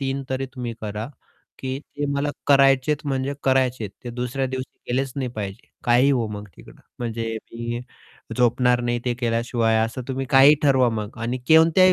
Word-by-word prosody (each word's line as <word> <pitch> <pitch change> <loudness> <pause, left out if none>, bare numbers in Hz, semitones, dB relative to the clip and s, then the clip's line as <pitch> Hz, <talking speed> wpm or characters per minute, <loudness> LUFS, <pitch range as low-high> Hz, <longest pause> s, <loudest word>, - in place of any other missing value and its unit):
3 135 0 -2
तरी 135 0 -1
तुम्ही 120 -2 -4
करा, 105 +1 -4 0.5
की 130 0 -3
ते 145 -1 -6
मला 145 +1 0 0.2
करायचे 135 0 +5
आहे, 150 0 -4
म्हणजे 135 +1 -1
करायचे 130 -3 +2
आहे. - - -4 0.2
ते 120 - -4
दुसऱ्या 125 +2 -2
दिवशी 130 0 -6
गेलेच 130 +1 0
नाही 130 -3 -1
पाहिजे. 100 -2 -5 0.2
काहीही 125 +4 +4
होवो 120 -5 +1
मग 105 - -10
तिकडे. - - -15 0.2
म्हणजे 115 -1 -3 0.2
मी 120 +1 -4 0.6
झोपणार 125 0 +3
नाही 120 0 -1
ते 125 - 0
केल्याशिवाय 115 -1 +1
असं 115 +3 -5
तुम्ही 135 0 -2
काहीही 140 +2 +8
ठरवा 130 -4 +4
मग 110 0 -4
आणि 120 +2 -2
कोणत्याही 165 +4 +7
125 Hz, 175 wpm, -23 LUFS, 120-135 Hz, 0.6 s, काहीही